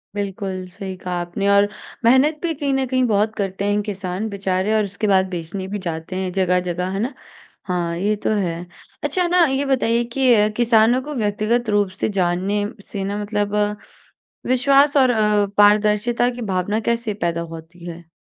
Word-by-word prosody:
बिल्कुल 195 -2 -4
सही 190 +1 -7
कहा 180 0 -5
आपने 175 +3 -3
और 200 0 +5 0.4
मेहनत 270 +6 +4
भी 335 -1 0
कहीं 285 -2 -2
न 270 0 +1
कहीं 255 0 +1
बहुत 215 0 +1
करते 195 0 -3
हैं 205 0 +1
किसान 195 0 -4
बेचारे 195 0 -1
और 215 - +3
उसके 200 +2 -3
बाद 190 -1 +3
बेचने 180 +2 -5
भी 205 - -2
जाते 160 +2 -5
हैं 185 -1 -2
जगह-जगह 180 -1 0
है 195 - -3
ना? 240 +6 -2 0.5
हाँ, 175 -2 -1
ये 205 +4 +1
तो 210 - -3
है। 175 -4 -2 0.4
अच्छा 345 +5 +1
न 355 -2 +6
ये 270 +1 0
बताइए 240 -3 +1
कि 265 -1 +3 0.3
किसानों 235 +1 +4
को 300 +3 -7
व्यक्तिगत 215 +1 0
रूप 205 -2 +2
से - - +1
जानने 185 +4 0
म 210 - -6
से 200 -2 -5
ना 200 +1 -3
मतलब 205 0 -2 0.9
विश्वास 275 +3 +4
और 260 -2 +5
अ, 210 -2 +2
पारदर्शिता 210 +3 +4
की 245 0 -7
भावना 185 +4 0
कैसे 235 -2 -1
पैदा 170 0 -1
होती 165 +2 -11
है? 170 -1 -9
205 Hz, 180 wpm, -21 LUFS, 185-235 Hz, 0.9 s, न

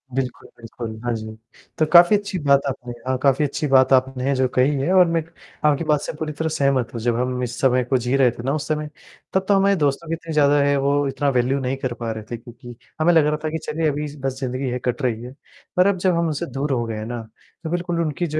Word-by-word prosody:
बिल्कुल, 130 -2 -3
बिल्कुल, 115 -1 -8
हाँ 120 -1 -1
जी। 110 0 -7 0.4
तो 155 - +3
काफ़ी 175 +4 +8
अच्छी 200 -2 -5
बात 140 0 +5
आपने 125 -2 -5
हाँ, 130 0 +1
काफ़ी 140 +2 +3
अच्छी 145 +2 -2
बात 130 -1 +4
आपने 130 +1 +2
जो 130 0 +2
कही 130 +3 +4
है 160 +8 0
और 185 -1 +7
मैं, 165 -1 +1 0.4
आपकी 150 +1 +3
बात 150 -2 +1
से - - -5
पूरी 155 -1 -3
तरह 160 +2 -2
सहमत 140 -6 0
हूँ, 115 - -5
जब 120 0 +1
हम 125 0 -1
इस 125 0 -4
समय 130 -1 +3
को 130 +1 +1
जी 125 +2 -1
रहे 130 -3 +4
थे 120 0 -9
ना 135 +2 0
उस 155 - -3
समय, 150 -1 -2 0.4
तब 190 0 +1
तो 205 - +4
हमारे 195 +1 +3
दोस्तों 140 +4 0
की - - -1
इतनी 165 -1 -5
ज़्यादा 145 -1 +4
है 140 0 +2
वो 140 - +3
इतना 140 +1 0
वैल्यू 130 +3 +1
नहीं 130 +1 -2
कर 130 -2 -3
पा 115 -1 -2
रहे 110 -1 -6
थे, 120 - -3
क्योंकि 120 +1 -12 0.3
हमें 175 +2 +4
लग 160 -2 +5
रहा 150 0 +1
था 155 - -1
कि 160 - -3
चलिए 160 +1 -1
अभी 150 +1 -3 0.2
बस 135 -1 -2
ज़िंदगी 130 0 -3
है 125 +1 -2
कट 125 +4 -1
रही 115 -3 -1
है। 125 +2 -9 0.4
पर 180 +2 +5
अब 200 -2 +2
जब 180 -2 +4
हम 170 - +1
उनसे 155 +2 -2
दूर 145 +1 -1
हो 120 -3 +1
गए 110 -1 -4
हैं 110 - -5
ना, 120 0 -5 0.4
तो 160 - -4
बिल्कुल 175 0 -2
उनकी 165 +2 -2
जो 155 +1 -2
135 Hz, 265 wpm, -22 LUFS, 125-155 Hz, 0.4 s, काफ़ी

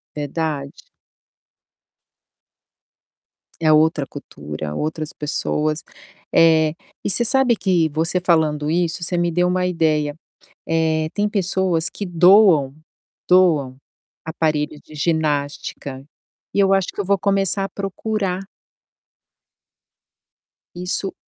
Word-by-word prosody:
Verdade. 145 -1 -3 2.9
É 155 -1 +4
outra 155 -2 +3
cultura, 75 - -7
outras 155 - -3
pessoas. 150 -1 -2 0.5
Eh, 160 -2 +4 0.3
e - - -1
você 240 +4 +5
sabe 255 0 +4
que, 175 -6 +1
você 165 +4 -1
falando 155 -3 +1
isso, 170 0 -1
você 175 +1 -1
me 175 0 +1
deu 180 +2 +1
uma 180 0 0
ideia. 155 -4 0 0.5
Eh, 160 -1 +1
tem 205 0 +1
pessoas 185 -4 0
que 205 - -6
doam, 175 -5 +5 0.5
doam 160 -8 +3 0.5
aparelho 155 -2 -1
de 155 - -15
ginástica. 145 -3 -2 0.5
E - - +2
eu 195 0 +4
acho 195 -2 +1
que - - -6
eu - - -1
vou 200 +1 +1
começar 195 0 0
a - - -3
procurar. 195 0 -3 2.4
Isso. 180 +2 -3
165 Hz, 105 wpm, -20 LUFS, 150-185 Hz, 2.9 s, você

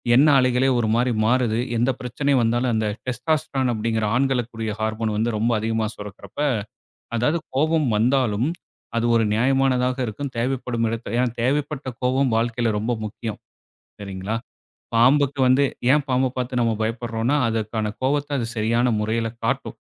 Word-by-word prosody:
எண்ண 140 +5 +6
அலைகளே 130 +1 +2
ஒரு 110 - +1
மாதிரி 125 +1 +2
மாறுது. 120 -1 +2 0.2
எந்த 120 +3 +2
பிரச்சனை 125 +3 -2
வந்தாலும் 120 +2 +1
அந்த 110 -1 0 0.2
டெஸ்டாஸ்டரன் 130 0 0
அப்படிங்கிற 110 0 -1
ஆண்களுக்கு 125 -2 +1
கூடிய 110 -1 -3
ஹார்மோன் 110 0 -1
வந்து 115 +2 +1
ரொம்ப 115 +3 +1
அதிகமா 110 0 -1
சுரக்குறப்ப, 105 +6 -10 0.8
அதாவது 150 +9 +1 0.2
கோபம் 155 0 +2
வந்தாலும் 120 +1 +2 0.5
அது 115 - +1
ஒரு 115 -1 +3
நியாயமானதாக 130 +1 +2
இருக்கும், 130 +5 -5
தேவைப்படும் 120 -2 -1
இடத்துல. 115 -1 -4
ஏன்னா 125 0 +2
தேவைப்பட்ட 140 +2 -1
கோபம், 130 0 +2
வாழ்க்கையில 115 +1 0
ரொம்ப 110 +4 -1
முக்கியம். 110 +1 -6 0.6
சரிங்களா! 100 +2 -4 0.6
பாம்புக்கு 140 +4 +4
வந்து 130 +3 +4 0.3
ஏன் 150 +1 +3
பாம்ப 130 +1 +2
பார்த்து 125 0 -1
நம்ம 115 -1 +2
பயப்படுறோம்னா 115 +3 -1
அதற்கான 110 -1 -1
கோபத்த 145 +2 0
அது 120 - -1
சரியான 115 +3 +2
முறையில 115 +2 0 0.2
காட்டும். - - -1
120 Hz, 140 wpm, -23 LUFS, 110-130 Hz, 0.8 s, எண்ண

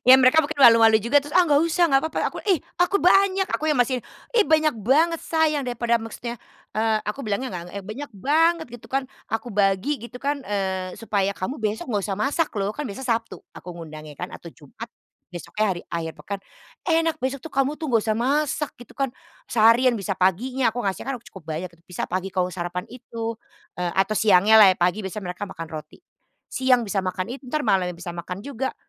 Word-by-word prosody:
Ya 260 - +10
mereka 265 +5 +6
mungkin 290 0 -5
malu-malu 225 -3 +7
juga 235 +7 +3
terus, 290 - -9
"Ah 365 -1 +6
nggak 290 -2 +4
usah, 335 +1 +3
nggak 270 -3 +3
papa," - - -1
aku, - - -8
"Ih, 365 - +4 0.2
aku 380 +3 +2
banyak, 385 +1 +4
aku 310 -4 -1
yang 295 - +1
masih 250 0 +1 0.3
ih, 460 - +6
banyak 310 -2 +3
banget 315 - +3
sayang 315 -3 +1
daripada" 240 -2 0
maksudnya, 235 +1 -6 0.4
eee, 220 0 +2
aku 210 +7 -3
bilangnya 220 +5 -2
nggak, 175 - -4
eee, 200 -1 -7
"Banyak 265 +7 -6
banget," 320 - +2
gitu 240 - -11
kan. 270 0 0 0.2
"Aku 225 0 -3
bagi 200 +7 +1
gitu 240 +1 -9
kan, 285 +1 -2
eee, 190 -4 -3
supaya 200 -3 0
kamu 200 +6 -5
besok 215 +1 -2
nggak 205 -3 0
usah 195 - -1
masak 290 +7 0
loh," 200 +2 -1
kan 295 - -4
besok 250 +6 -7
Sabtu, 230 -2 -1 0.2
aku - - -11
ngundangnya 155 -3 -10
kan 180 - -6
atau 170 - -10
Jumat. 165 - -11 0.4
Besoknya 195 +5 -3
hari 175 -2 -3
akhir 165 -1 -3
pekan, 200 -1 -5 0.5
"Enak, 330 -1 +2
besok 265 +1 -2
tuh 320 - -8
kamu 275 +2 +1
tuh, 315 - -3
nggak 230 -3 +3
usah 215 -1 0
masak," 290 +3 0
gitu 245 - -14
kan. 275 -1 +1 0.4
Seharian 235 +2 +5
bisa 200 -1 -2
paginya, 235 +8 +1
aku 245 - -2
ngasihnya 195 +5 -2
kan - - -4
cukup 190 -7 -13
banyak 180 +2 -5
itu, 170 - -23
bisa 180 - -3
pagi 185 +1 -2
kamu 185 -1 +1
sarapan 175 +1 -4
itu, 230 -2 -6 0.4
eee, 175 -1 -1
atau 195 +2 +2
siangnyalah 205 0 +7
ya. - - -22
Pagi 180 +4 +1
biasanya 200 +1 -6
mereka 205 +3 -6
makan 165 -2 -8
roti, 155 -1 -8 0.5
"Siang 255 -2 +3
bisa 200 -1 -2
makan 185 +3 -3
itu, 270 0 -9
entar 305 +2 -1
malamnya 185 -4 +1
bisa 175 +1 -7
makan 180 +3 -6
juga. 265 -1 -3
230 Hz, 205 wpm, -24 LUFS, 190-275 Hz, 0.5 s, Ya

